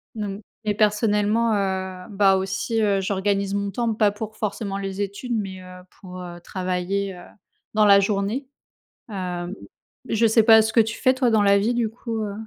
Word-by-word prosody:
mmh. 205 -2 -4 0.3
Mais, 210 - +1
personnellement, 210 +1 +2
heu, 190 -2 -2
bah 195 -1 +4
aussi, 195 +4 -1
heu, 200 -2 +2
j'organise 200 +1 -1
mon 200 0 -1
temps, 230 +2 -1
pas 210 -1 +3
pour 215 +1 -7
forcément 205 -2 -3
les 195 0 -4
études, 205 +5 -4
mais 190 -3 -5
heu, 185 0 -12 0.2
pour 185 -1 -9
heu, 175 -1 -8
travailler, 185 +2 -2
heu, 175 - -12 0.5
dans 215 -1 +5
la 200 -1 +7
journée. 205 +7 -1 0.6
Hem, 180 -2 -4 0.5
je 225 +1 +2
sais 220 0 +4
pas 220 -1 +8
ce 220 0 -1
que 230 - +3
tu 225 +1 -2
fais, 255 - +3
toi, 250 -3 +2
dans 215 -1 +4
la 200 0 +5
vie, 220 +5 +1
du 235 -2 0
coup, 225 -1 -5
heu? 200 -1 -4
200 Hz, 190 wpm, -23 LUFS, 195-220 Hz, 0.6 s, pas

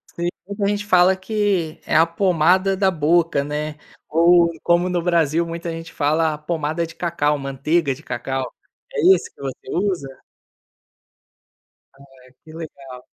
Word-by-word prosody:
Sim, 170 0 -2 0.2
muita 200 0 -2
gente 205 0 -1
fala 185 -2 +5
que, 190 -5 -1
é - - -1
a 160 +1 +6
"pomada 180 +2 +2
da 190 0 +3
boca", 165 -2 +2
né. 150 +1 -4 0.3
Ou, 170 +2 +5
como 175 +1 +2
no 180 -1 0
Brasil 170 -1 +1
muita 170 +1 -5
gente 165 0 -8
fala 155 +1 +1
a - - -6
"pomada 160 +1 -2
de 165 - -14
cacau", 150 -4 0
manteiga 140 +2 0
de 135 - -13
cacau. 135 -4 -4 0.4
É 470 - -1
esse - - -2
que - - -17
você 135 -2 -7
usa? 170 -9 -2 1.8
Ah, 135 0 -19 0.4
que 160 - -14
legal. 140 -6 -9
165 Hz, 150 wpm, -21 LUFS, 150-180 Hz, 1.8 s, a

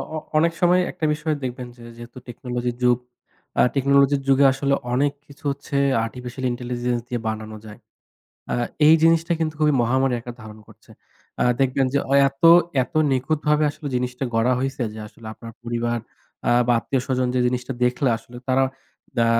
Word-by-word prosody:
অ - - -1 0.2
অনেক 165 +2 +3
সময় 180 +1 +4
একটা 155 - -3
বিষয় 155 +1 -2
দেখবেন 125 0 -4
যে - - -15 0.2
যেহেতু 120 +1 -11
টেকনোলজির 120 0 -4
যুগ। 120 -1 +4 0.6
আ - - +7
টেকনোলজির 140 0 +3
যুগে 135 +1 +5
আসলে 140 +1 0 0.2
অনেক 140 +3 +2 0.2
কিছু 145 +2 -17
হচ্ছে 140 0 -4 0.3
আর্টিফিশিয়াল 125 +2 -6
ইন্টেলিজেন্স 120 0 -2
দিয়ে 120 -2 -3
বানানো 110 0 -4
যায়। 105 - -11 0.7
আ - - 0 0.3
এই 160 - +8
জিনিসটা 165 +1 +3
কিন্তু 155 -1 -1
খুবই 150 -2 +3
মহামারী 130 +2 +2
আকার 120 0 -8
ধারণ 110 0 -11
করছে। - - -19 0.5
আ - - +3 0.2
দেখবেন 135 0 +2
যে - - +4 0.3
এত, 135 +2 -17 0.4
এত 155 - -9 0.2
নিখুঁতভাবে 150 +3 +1
আসলে 145 0 -7
জিনিসটা 125 +1 -3
গড়া 115 +3 +3
হইছে 135 -1 -2
যে - - -9
আসলে 115 0 -15
আপনার 115 0 -11
পরিবার 120 0 -2 0.5
আ - - +4 0.2
বা 120 - +3
আত্মীয়স্বজন 130 -1 -1
যে 125 - +2
জিনিসটা 125 +1 -2
দেখলে 125 +2 +1
আসলে 120 +2 -14
তারা 130 +1 +3 0.6
আ - - +2
130 Hz, 165 wpm, -22 LUFS, 120-140 Hz, 0.7 s, এই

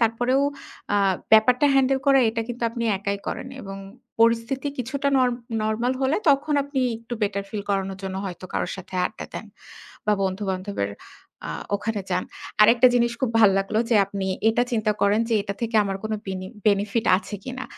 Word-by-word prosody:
তারপরেও 245 +4 +2 0.5
অ্যা 205 - +3 0.3
ব্যাপারটা 250 +6 +6
হ্যান্ডেল 270 0 +3
করা 275 -1 +6
এটা 225 +1 -2
কিন্তু 245 0 -6
আপনি 235 0 -3
একাই 200 0 -2
করেন - - -4
এবং 195 -3 -7 0.4
পরিস্থিতি 230 +4 +2
কিছুটা 270 +3 -1
নর 255 -1 +4 0.3
নরমাল 220 +4 0
হলে, 265 +4 +2
তখন 285 +2 +2
আপনি 285 -1 -3 0.2
একটু 230 +1 -7
বেটার 200 -1 -1
ফিল 210 -2 -4
করানোর 195 -1 -1
জন্য 190 0 -4
হয়তো 180 -1 -6
কারো - - -1
সাথে 190 0 -10
আড্ডা - - -4
দেন। - - -6 0.6
বা 210 - +4
বন্ধুবান্ধবের 190 - -2 0.5
অ্যা - - -5 0.3
ওখানে 210 +1 -3
যান। 180 0 0 0.4
আরেকটা 235 +3 +6
জিনিস 235 -1 +2
খুব 260 - +1
ভাল্লাগলো, 195 0 +3
যে - - +4
আপনি 200 -1 -4 0.2
এটা 235 +2 +2
চিন্তা 215 -2 +1
করেন 205 +2 +3
যে, 230 - +1
"এটা 200 -1 -4
থেকে 230 -1 0
আমার 195 -1 -2
কোন 215 - -2
বিনি 185 -1 -4 0.2
বেনিফিট 205 +2 +2
আছে 205 +2 -6
কিনা? 260 0 -5
220 Hz, 170 wpm, -24 LUFS, 200-245 Hz, 0.6 s, ব্যাপারটা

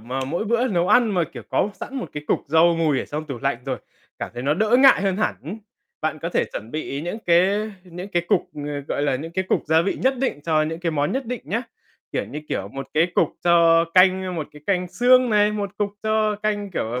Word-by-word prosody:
mà 125 +4 -4
mỗi 170 +9 -2
bữa 235 +3 +1
nấu 175 -5 +1
ăn 245 -2 +5
mà, 175 - +2
kiểu, 120 -3 -8
có 185 +10 +1
sẵn 275 - -7
một 260 - -4
cái 150 - -6
cục - - +1
rau 165 +3 +4
mùi 160 -4 +1
ở - - -3
trong 150 +1 -5
tủ 135 -4 -5
lạnh 135 -2 -1
rồi, 135 - -3 0.4
cảm - - -5
thấy 120 - -5
nó 145 +2 +1
đỡ 215 +7 +3
ngại 270 -8 +6
hơn 195 -2 +1
hẳn, 215 - 0
hứm. 180 +10 -6 0.4
Bạn 155 0 -2
có 165 +3 -3
thể - - +1
chuẩn 110 +3 -6
bị 150 -2 -4
những 175 +7 -4
cái 195 +5 +3
những 180 +2 -8
cái 175 -3 0
cục, 200 -5 +2
ng 145 -1 -6 0.2
gọi - - -1
là, 140 -3 +1
những 160 +5 -7
cái 185 +2 -1
cục - - +1
gia 160 +1 +4
vị 195 - -1
nhất 265 +1 +3
định 145 - -1
cho 155 -1 +2
những 160 +2 -3
cái 170 -2 -1
món 145 -1 0
nhất 265 -2 -2
định 250 -1 -4
nhá. 225 +10 -2 0.5
Kiểu - - -1
như, 150 - -7
kiểu, 95 - -3
một 135 +5 -7
cái 165 +3 +4
cục - - +3 0.2
cho 170 -1 +5
canh, 185 0 +4
một 155 -3 -4
cái 150 0 -14
canh 180 -2 0
xương 245 +5 +4
này, 210 0 +3
một 205 -2 -3
cục 205 -1 0
cho 215 -1 +1
canh, 205 -1 -2
kiểu, 115 -9 -3
à, 125 - -2
175 Hz, 260 wpm, -22 LUFS, 150-210 Hz, 0.5 s, ngại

